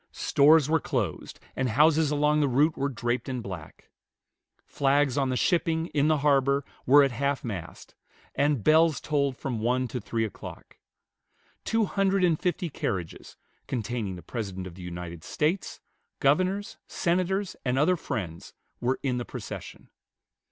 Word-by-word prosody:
Stores 150 0 +4
were 160 +1 +3
closed, - - -3 0.2
and 130 -1 0
houses 150 +5 +4
along 150 +1 +2
the 145 - +3
route 145 +5 +3
were 140 +1 -1
draped 120 +1 -2
in 130 -1 -2
black. 95 -8 -9 0.7
Flags 140 -1 +1
on 135 -2 +1
the 130 - 0
shipping, 165 -1 +1
in 145 0 +2
the 155 -1 +3
harbor, 140 -1 +3 0.2
were 145 +3 +8
at 135 - +1
half 140 +3 -1
mast; 95 -9 -7 0.4
and 140 -5 +1
bells 160 -2 +4
tolled 140 -3 0
from 125 -5 -3
one 125 +3 +1
to 125 - -4
three 115 +2 -1
o'clock. 105 - -10 0.8
Two 225 -1 +1
hundred 195 -1 +1
and 170 -4 +3
fifty 180 0 -1
carriages, 95 - -5 0.3
containing 115 -5 -3
the 90 - -11
President 95 -6 -5
of 90 - -8
the 90 - -12
United 85 -2 -7
States, 160 +4 -1 0.4
governors, 185 +8 +1
senators, 185 +3 -1
and 125 0 0
other 160 +6 +4
friends, 90 - -5 0.3
were 125 +2 0
in 125 -3 0
the - - -3
procession. - - -8
140 Hz, 150 wpm, -27 LUFS, 120-155 Hz, 0.8 s, were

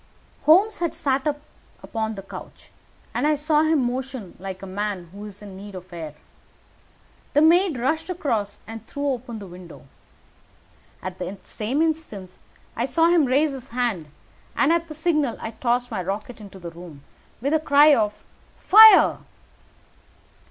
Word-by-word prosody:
Holmes 395 +7 +5
had 335 -2 -1
sat 275 -3 0 0.6
upon 220 -1 -3
the 195 - -8
couch, 195 - -11 0.4
and 295 - 0
I 305 - +3
saw 300 +1 +2
him 315 -3 +2
motion 250 -5 -5
like 190 0 -7
a - - -5
man 195 -2 -4
who 200 +2 -9
is 205 0 -10
in 200 -2 -10
need 200 +1 -10
of 180 0 -10
air. 160 -3 -7 1.2
A - - +6
maid 335 -1 +4
rushed 315 +9 -1
across 235 - -2
and 225 -1 -9
threw 285 0 -3
open 245 -3 -4
the 205 - -8
window. 180 -4 -12 1.2
At 185 0 -6
the 185 +2 -5
same 255 +9 -1
instant 300 - -4 0.4
I 235 - 0
saw 330 +5 +3
him 340 -4 +4
raise 280 +4 +2
his 265 -1 -8
hand, 230 - -2 0.5
and 290 +4 +3
at 335 0 0
the 310 - -8
signal 305 -5 0
I 225 - -5
tossed 245 +2 -1
my 215 - -2
rocket 210 +6 -5
into 200 -2 -11
the 170 -2 -8
room 165 -4 -12 0.4
with 280 +5 -1
a 315 - +4
cry 295 0 +6
of 210 -5 0 0.3
"Fire!" 435 0 +8
245 Hz, 160 wpm, -23 LUFS, 195-305 Hz, 1.2 s, Fire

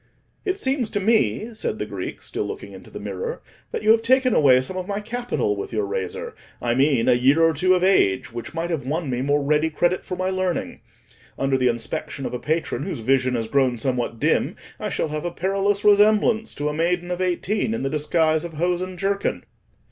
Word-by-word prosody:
"It 380 -1 0
seems 265 - 0
to 205 - -1
me," 225 +2 +1
said 220 - -2
the - - -3
Greek, - - -6
still - - -3
looking - - -7
into - - -12
the - - -8
mirror, 475 +1 -4 0.3
"that 460 -2 -3
you - - +6
have 225 0 +5
taken 255 +1 +3
away 130 -4 +6
some 130 +9 -3
of 185 0 -4
my 200 0 -2
capital 225 - -2
with 100 - -5
your 105 -3 0
razor—I 100 +4 -4
mean 135 -2 +2
a 125 - +6
year 130 +5 +4
or 165 0 +4
two 185 +5 +3
of 180 - 0
age, 130 - +3
which 120 +6 -7
might 170 +1 -2
have 160 -6 -2
won 150 +2 -2
me 125 0 -1
more 145 +1 +1
ready 150 +2 +2
credit 175 +3 0
for 180 - -5
my 185 +1 -1
learning. 185 -2 -2 0.6
Under 135 0 +1
the 130 -1 +2
inspection 135 +4 -3
of - - -4
a 125 - -3
patron 160 +4 -1
whose 195 - -3
vision 130 +2 +1
has 115 -2 -2
grown 130 -1 +2
somewhat 120 -1 -2
dim, - - +1 0.2
I - - -3
shall - - -1
have 150 0 -3
a 175 - -1
perilous 195 +3 0
resemblance 210 +2 +4
to 145 - -2
a 150 - -1
maiden 175 +3 0
of 180 +1 -2
eighteen 195 +5 0
in - - -3
the - - 0
disguise 155 +1 +1
of 170 -1 -6
hose 175 +3 0
and 185 0 -5
jerkin." 195 +2 -1
165 Hz, 215 wpm, -23 LUFS, 135-200 Hz, 0.6 s, you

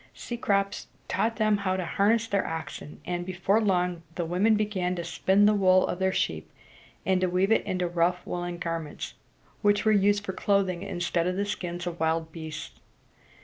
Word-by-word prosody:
Cecrops 200 -5 -1 0.2
taught 230 +1 0
them 215 -2 +2
how 190 -2 -1
to 185 - -2
harness 215 +5 +2
their 200 -3 0
oxen; 160 -2 -6
and 175 0 -2
before 190 +4 +1
long 180 -4 +1
the 175 - -2
women 190 +7 +3
began 195 -4 -1
to 170 - -4
spin 190 +4 +3
the 210 - +5
wool 185 -2 +4
of 180 - -3
their 190 0 +2
sheep, - - -2 0.5
and 190 -1 +2
to 185 - +2
weave 185 +3 +1
it 225 - +4
into 180 -1 0
rough 175 +1 0
woolen 175 0 -4
garments, 165 -3 -4 0.5
which 205 0 +3
were 220 - +5
used 205 0 +3
for 190 - -3
clothing, 190 -3 +1
instead 175 -3 -1
of 180 - 0
the 200 +2 0
skins 175 -3 -4
of 175 -1 -4
wild 160 0 0
beasts. 155 -1 -7
185 Hz, 185 wpm, -27 LUFS, 175-205 Hz, 0.5 s, the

